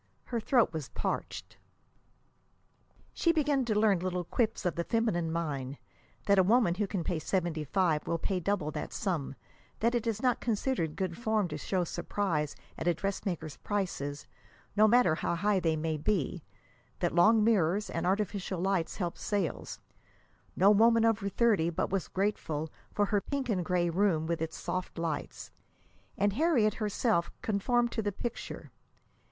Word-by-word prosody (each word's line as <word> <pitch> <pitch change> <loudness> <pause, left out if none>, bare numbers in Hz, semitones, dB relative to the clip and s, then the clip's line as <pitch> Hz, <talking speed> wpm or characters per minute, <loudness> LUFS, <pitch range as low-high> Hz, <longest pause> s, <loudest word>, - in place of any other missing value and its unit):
Her 235 - -3
throat 235 - +3
was 155 -4 -4
parched. - - -4 1.6
She 335 - +3
began 290 -5 +1
to 215 -3 0
learn 210 -4 +4
little 180 0 -2
quips 225 +3 -1
of 180 - +1
the 170 - -2
feminine 175 -7 0
mind: 145 -5 -3 0.5
that 200 -1 +4
a - - +6
woman 215 -2 +4
who 205 +3 -1
can 190 -3 -2
pay 170 -1 -1
seventy 170 -3 -1
five 160 0 +1
will 170 - 0
pay 185 +2 -1
double 180 -4 -1
that - - -5
sum; 165 -9 -2 0.4
that 235 +2 +2
it 235 -1 -1
is 220 -2 0
not 250 0 +2
considered 220 - -1
good 185 -3 -2
form 220 -4 0
to 150 - -4
show 185 +3 0
surprise 165 -4 -2 0.2
at - - -3
a 175 - +3
dressmaker's 175 -5 -3
prices, 175 -8 -3 0.5
no 215 +1 +6
matter 235 -7 +5
how 165 - -1
high 200 +3 +2
they 165 -3 +1
may 155 0 -1
be; 175 +1 -1 0.6
that 175 - 0
long 215 +6 +5
mirrors 205 -2 +2
and 170 - -2
artificial 195 -1 -1
light 190 -2 0
help 175 -4 -3
sales 200 -6 -2 0.8
no 195 +3 +6
woman 230 +2 +5
over 220 -3 +1
thirty 200 -7 +2
but 170 - -2
was 190 -5 -1
grateful 160 -6 -2 0.2
for 205 - +1
her 205 0 +1
pink 275 0 -3
and 185 -5 +1
gray 175 +1 +1
room 170 -2 +2
with 165 -1 -2
its 160 0 -3
soft 185 -1 -4
lights. 165 -3 -4 0.7
And 205 -1 +2
Harriet 250 -6 +3
herself 210 -4 0
conformed 235 +3 +1
to 225 - -1
the 205 -1 -1
picture. 235 +4 -6
195 Hz, 165 wpm, -30 LUFS, 170-215 Hz, 1.6 s, a